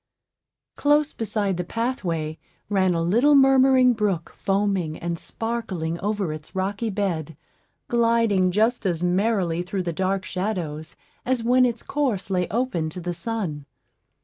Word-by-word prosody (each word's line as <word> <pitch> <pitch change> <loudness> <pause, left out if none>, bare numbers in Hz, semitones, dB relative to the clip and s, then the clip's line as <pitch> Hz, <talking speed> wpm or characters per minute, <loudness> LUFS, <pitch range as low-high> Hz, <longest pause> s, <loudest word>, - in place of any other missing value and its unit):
Close 295 +1 +3
beside 205 -4 -1
the 180 - -1
pathway 170 - -2 0.3
ran 190 -3 +2
a 165 - 0
little 240 - +4
murmuring 265 -2 +6
brook, 205 -7 -1
foaming 195 -5 0
and 170 -1 -4
sparkling 195 -8 -3
over 200 -5 -1
its 155 +3 -10
rocky 200 +4 -1
bed, 170 -7 -2 0.5
gliding 230 -5 +3
just 220 +6 +1
as 175 -1 -1
merrily 180 -2 +1
through 185 +1 -3
the 170 -1 -3
dark 190 +2 -1
shadows 170 -5 -4 0.3
as 255 -2 0
when 250 +2 +4
its 235 -2 -4
course 255 -10 -1
lay 180 -2 +1
open 205 -7 -1
to 180 - -8
the 175 0 -3
sun. 175 -9 -4
195 Hz, 140 wpm, -24 LUFS, 175-230 Hz, 0.5 s, murmuring